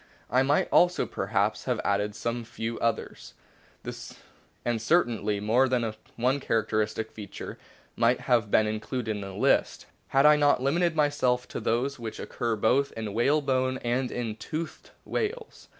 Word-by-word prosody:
I 130 +2 +4
might 140 +2 +2
also 180 0 +4
perhaps - - -1
have - - 0
added 105 +1 0
some 120 +1 -3
few 115 0 -5
others, 115 - -3 1.3
and 120 -2 0
cer 170 +10 +4
tainly 105 -3 -2
more 120 +6 +3
than 120 -3 0 0.2
one 130 +4 +1
characteristic 110 -2 -1
feature 105 -3 -8 0.4
might 120 +2 +2
have 120 -4 +2
been 110 - +4
included 110 +2 -3
in 105 -1 -3
the 95 -1 -7
list, - - +1 0.2
had 135 +1 +3
I 150 0 +7
not 145 -3 +4
limited 165 +6 +1
myself 140 -5 +1
to - - -4
those 130 +4 -1
which 115 -2 -6
occur 120 -3 -2
both 125 +6 +2
in 110 -3 -4
whalebone 130 +1 +1
and 125 +2 0
in 115 -3 -3
toothed 155 +6 -6 0.2
whales. 450 +1 -4
120 Hz, 150 wpm, -27 LUFS, 110-135 Hz, 1.3 s, I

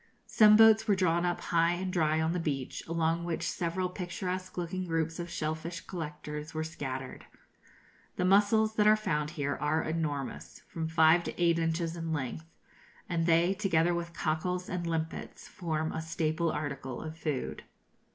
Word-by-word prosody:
Some 215 -1 +6
boats 220 0 +7
were 205 - +4
drawn 175 -2 +2
up 175 - -1
high 170 0 +2
and 185 +1 -3
dry 155 -2 +2
on 160 +1 +1
the 180 - -1
beach, 140 -6 -3
along 165 0 0
which 170 -2 -2
several 180 +2 -1
picturesque 185 0 -5
looking 180 +1 -2
groups 165 0 -1
of 175 0 -4
shell 155 -2 -2
fish 170 +2 -6
collectors 150 -2 -6
were 155 - -1
scattered. 135 -5 -6 0.9
The 180 - 0
mussels 210 +3 +4
that 210 0 +4
are 215 - +7
found 150 -8 -1
here 140 -1 -1
are 155 +2 +1
enormous 155 -4 -4
from 160 -1 -4
five 160 +1 +5
to - - -6
eight 170 -1 +3
inches 165 0 -1
in 165 -1 -4
length 150 +2 -3 0.6
and 165 -1 0
they, 170 +3 +4
together 175 -4 +2
with 170 0 -3
cockles 180 +3 -2
and 175 -1 -3
limpets, 165 -1 -4
form 160 -4 -2
a 160 - -3
staple 160 +1 -1
article 140 -4 -4
of 160 0 -6
food. 150 -5 -3
165 Hz, 170 wpm, -30 LUFS, 155-180 Hz, 0.9 s, boats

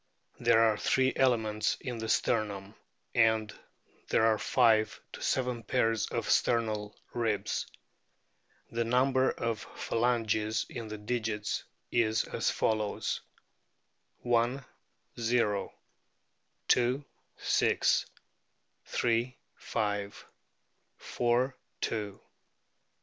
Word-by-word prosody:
There 115 - +4
are 110 -2 +3
three 130 +4 +2
elements 110 -5 +2
in 120 -3 -5
the 110 0 -4
sternum, 100 -2 0 0.4
and 110 -2 +3 0.6
there 110 - +3
are 110 -1 +3
five 110 -4 +3
to - - -8
seven 125 -2 0
pairs 115 0 +1
of - - -3
sternal 110 -3 +1 0.2
ribs. 115 -4 -1 1.0
The 115 0 0
number 130 +2 +3
of 115 -2 -2 0.2
phalanges 110 -2 0
in 115 -3 -6
the 110 0 -6
digits 105 -1 -2 0.3
is 110 -2 +2
as - - -1
follows: 110 -2 -1 1.0
I, - - -5 0.9
o. 115 -4 +1 1.0
II, 125 +3 0 0.3
6. - - +2 1.0
Ill, 120 +1 +2 0.2
5. 100 -1 -3 0.7
IV, 125 +2 +1 0.3
2. 105 -2 -1
V, 100 - -16
i. - - -28
115 Hz, 95 wpm, -30 LUFS, 105-120 Hz, 1.0 s, There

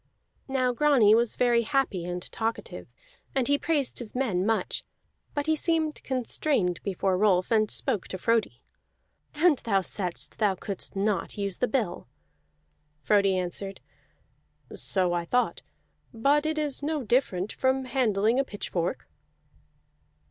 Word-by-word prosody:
Now 255 -2 +1
Grani 250 -6 +5
was 230 0 +3
very 240 -1 +3
happy 235 -8 0
and 180 0 -4
talkative, 225 0 -4 0.5
and 265 -3 +2
he 285 0 +3
praised 295 -5 0
his 235 -2 -4
men 220 -9 0
much; 225 0 0 0.5
but 290 -1 -1
he 315 0 +2
seemed 315 -1 0
constrained 250 - 0
before 190 -1 0
Rolf, 190 -2 +3
and 215 -2 +3
spoke 230 -9 -2
to 185 - -5
Frodi. 230 +3 0 0.7
"And 305 -2 +4
thou 195 -4 +1
saidst 180 -1 -4
thou 205 -3 +2
couldst 195 +1 -6
not 200 -1 -1
use 200 -3 -2
the 250 - +1
bill!" 220 - -2 0.9
Frodi 195 +3 +3
answered, 185 +2 -4 0.9
"So 175 +8 0
I 175 -1 0
thought, 245 +9 0 0.5
but 285 +6 +2
it 315 0 -1
is 295 -3 -1
no 300 -1 -1
different 210 -5 0
from 265 0 +1
handling 235 -2 +2
a - - +3
pitchfork." 190 -4 -3
225 Hz, 135 wpm, -27 LUFS, 195-270 Hz, 0.9 s, Grani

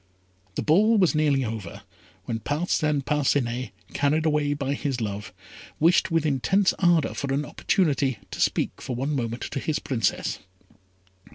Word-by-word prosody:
The - - -2
ball 210 +9 +4
was 185 -4 +4
nearly 145 -4 +2
over, 105 -3 -6 0.4
when 115 -2 -3
Parcin 150 +1 0
Parcinet, 130 -4 0 0.2
carried 150 +3 +1
away 150 -2 +1
by 140 -1 -2
his 140 -3 -2
love, 105 -2 -4 0.5
wished 170 +5 +4
with 165 -2 +1
intense 185 +8 +2
ardour 175 -4 +3
for 140 -1 -3
an 140 +2 0
opportunity 140 - +1
to - - -5
speak - - 0
for 125 - -4
one 140 +5 -1
moment 120 -2 -3
to - - -4
his 155 +2 -1
Princess. 115 -7 -1
145 Hz, 150 wpm, -25 LUFS, 125-155 Hz, 0.5 s, ball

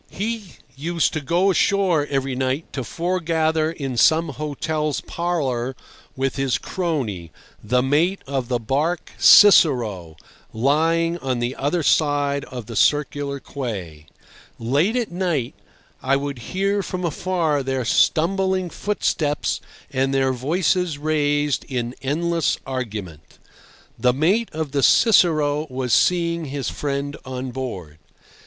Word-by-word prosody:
He 215 -2 -5 0.2
used 165 +4 0
to 155 - -2
go 175 +8 +2
ashore 185 -6 +2
every 135 -1 -1
night 130 +4 -2
to 130 - -3
foregather 160 -1 0
in 135 -6 -5
some 160 +5 +4
hotel's 150 +1 -2
parlour 135 -8 -2 0.4
with 135 +1 -2
his 135 -2 +1
crony, 125 - -3 0.3
the 125 +4 +1
mate 160 +8 +1
of 135 -3 -3
the 125 -1 0
barque 145 +9 -1
Cicero, 120 - +6 0.4
lying 165 +7 +1
on 130 -4 -2
the 120 +2 -2
other 150 +5 -1
side 145 -1 +1
of 125 -4 -8
the 115 +1 -8
Circular 145 +1 +1
Quay. 95 - -6 0.5
Late 145 - +1
at 240 -6 -1
night 175 -9 -1 0.5
I 135 +1 +2
would 140 -2 -3
hear 195 +2 0
from 185 -1 -4
afar 165 -3 0
their 130 -2 -2
stumbling 185 +6 +1
footsteps 155 -7 -1 0.3
and 135 0 0
their 135 -1 +2
voices 165 +4 0
raised 145 -1 0
in 120 -2 -3
endless 165 +4 0
argument. 105 - -6 0.6
The 125 -1 +3
mate 190 - +1
of 155 -2 -4
the 140 0 0
Cicero 155 - +4
was 130 -2 -2
seeing 170 -2 +2
his 140 -1 -3
friend 140 0 -3
on 130 0 -5
board. 95 - -6
145 Hz, 125 wpm, -22 LUFS, 130-170 Hz, 0.6 s, Cicero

